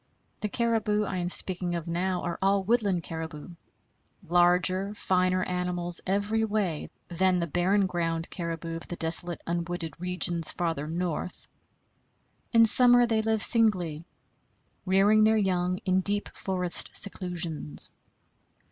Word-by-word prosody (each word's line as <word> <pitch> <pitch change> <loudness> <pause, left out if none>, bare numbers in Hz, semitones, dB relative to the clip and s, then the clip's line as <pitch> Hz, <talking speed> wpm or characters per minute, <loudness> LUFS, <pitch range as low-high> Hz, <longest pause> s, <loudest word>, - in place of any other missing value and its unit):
The 210 - -3
caribou 220 -2 0
I 190 -2 -4
am 175 -1 -2
speaking 180 -1 +2
of 170 0 -5
now 180 +2 -2
are 175 -1 -4
all 195 0 +2
woodland 200 -5 0
caribou 160 -2 -7 0.8
larger, 180 +3 +2
finer 185 -1 0
animals 180 -1 -2
every 205 +3 0
way 205 -8 -2 0.2
than 180 +1 +1
the 170 - -1
barren 185 +5 +1
ground 165 -2 -3
caribou 165 -1 -5
of 165 - -11
the 175 - -6
desolate 170 +1 +4
unwooded 170 -1 -4
regions 180 -2 -1
farther 165 -4 -3
north. 175 +1 -4 1.0
In 230 -1 +5
summer 245 +1 +5
they 225 -2 0
live 220 -1 0
singly, 180 -9 +1 0.8
rearing 200 +3 +4
their 220 +1 +3
young 180 -3 0
in 185 0 +1
deep 205 +2 +1
forest 180 -2 -1
seclusions. 170 - +1
180 Hz, 130 wpm, -27 LUFS, 170-200 Hz, 1.0 s, In